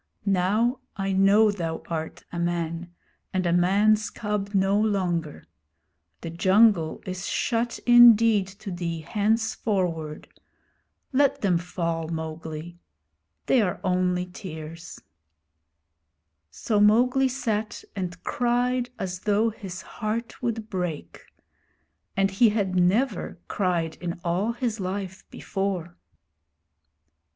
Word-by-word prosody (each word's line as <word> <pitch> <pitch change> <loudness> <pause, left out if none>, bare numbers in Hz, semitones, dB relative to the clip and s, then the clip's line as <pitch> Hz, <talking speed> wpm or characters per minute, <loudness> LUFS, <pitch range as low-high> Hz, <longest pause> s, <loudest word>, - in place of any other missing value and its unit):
'Now 205 +6 +2 0.2
I 195 0 -1
know 200 +3 +5
thou 165 -5 -4
art 160 -1 -5
a 170 - -4
man, 170 0 -2 0.4
and 185 -1 0
a 170 - +2
man's 205 +5 +3
cub 210 -2 -3
no 195 +1 +3
longer. 180 -7 -1 0.8
The 165 - -5
jungle 185 -1 +3
is 185 +1 -5
shut 235 0 -1
indeed 230 -4 +7
to 195 +1 -9
thee 170 -2 -3
henceforward. 195 -5 -1 0.9
Let 280 +1 +3
them 180 -4 +2
fall, 170 -2 -3
Mowgli. 160 +1 -6 0.7
They 255 - +4
are 180 -4 -1
only 180 -1 +1
tears.' 165 -3 -9 1.5
So 210 - -1
Mowgli 250 +6 +4
sat 220 -4 -2
and 180 -2 -5
cried 245 +1 0
as 185 -1 -4
though 215 +3 +1
his 190 -4 -8
heart 225 +5 -4
would 230 -3 -2
break; 180 -7 -4 1.0
and 195 0 +2
he 220 +4 +5
had 200 -3 -1
never 190 +3 +1
cried 175 -4 -1
in 175 -1 -5
all 185 +7 0
his 235 -2 -2
life 190 0 -5
before. 190 -3 -3
190 Hz, 110 wpm, -25 LUFS, 175-215 Hz, 1.5 s, indeed